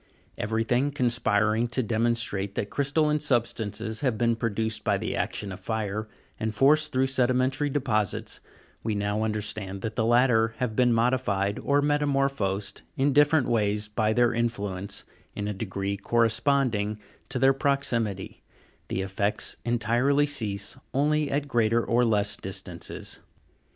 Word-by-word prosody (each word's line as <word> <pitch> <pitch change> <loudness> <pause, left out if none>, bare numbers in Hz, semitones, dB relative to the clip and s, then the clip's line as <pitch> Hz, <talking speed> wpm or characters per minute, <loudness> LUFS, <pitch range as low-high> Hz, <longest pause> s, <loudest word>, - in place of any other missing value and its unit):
Everything 115 +5 0
conspiring 115 -4 +1
to 125 +2 0
demonstrate 110 -3 0
that 100 - -3
crystalline 150 +2 +1
substances 110 -5 -1
have 130 -6 0
been 115 +1 +2
produced 110 -1 -2
by 100 -2 +2
the - - -3
action 100 -2 -2
of 95 - -7
fire, 110 +1 -3 0.3
and 110 0 -2
forced 150 +5 +4
through 130 0 +2
sedimentary 130 +2 +1
deposits, 115 -8 -1 0.4
we 110 -2 -2
now 105 +1 -1
understand 105 -3 -3
that 110 - -3
the 115 - +1
latter 115 -1 +3
have 115 -3 -2
been 125 0 +4
modified, 115 -4 +1
or 145 0 +2
metamorphosed 135 -9 0 0.2
in 140 +1 +2
different 145 -1 +4
ways 105 -3 +1
by 110 0 0
their 120 +1 +3
influence, 100 -4 -3 0.3
in 105 - -3
a 105 - -2
degree 100 0 -3
corresponding 115 0 +1 0.3
to - - -1
their 135 +2 +5
proxi 140 -3 +1
mity: 100 -3 -5 0.5
the 95 - -2
effects 100 +2 -1
entirely 120 +5 +2
cease 105 -9 -1 0.2
only 150 +1 +2
at 145 +1 -1
greater 115 -2 +2
or 120 +2 +2
less 105 -2 +2
distances. 95 -1 -5
115 Hz, 140 wpm, -27 LUFS, 105-130 Hz, 0.5 s, their